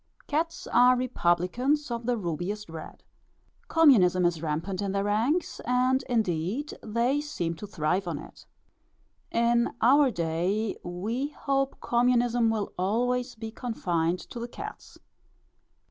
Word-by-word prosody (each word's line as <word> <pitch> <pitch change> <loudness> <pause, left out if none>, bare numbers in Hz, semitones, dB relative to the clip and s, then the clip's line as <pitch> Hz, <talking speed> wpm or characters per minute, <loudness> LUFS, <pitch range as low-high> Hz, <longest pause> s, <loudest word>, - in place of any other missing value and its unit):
Cats 330 +4 -2
are 250 +1 +5
republicans 250 - 0
of 235 0 -4
the 245 -1 +1
rubiest 185 +2 -4
red. 160 0 -9 0.6
Communism 190 - +5
is 170 -2 +1
rampant 165 +5 -2
in 195 -1 -2
their 200 0 0
ranks; 230 - 0
and 255 +2 +2
indeed, 220 - -1
they 235 +6 0
seem 175 - -3
to 210 - -7
thrive 180 +1 -1
on 165 -4 -2
it. - - -12 0.8
In 235 0 +2
our 275 +4 +5
day, 180 +3 -1
we 215 +10 -3
hope 275 -2 -2
communism 240 -1 +2
will 220 -2 -2
always 245 +6 0
be 225 0 -7
confined 180 -8 -1
to 240 - -6
the 235 - -4
cats. - - -9
225 Hz, 130 wpm, -27 LUFS, 180-250 Hz, 0.8 s, are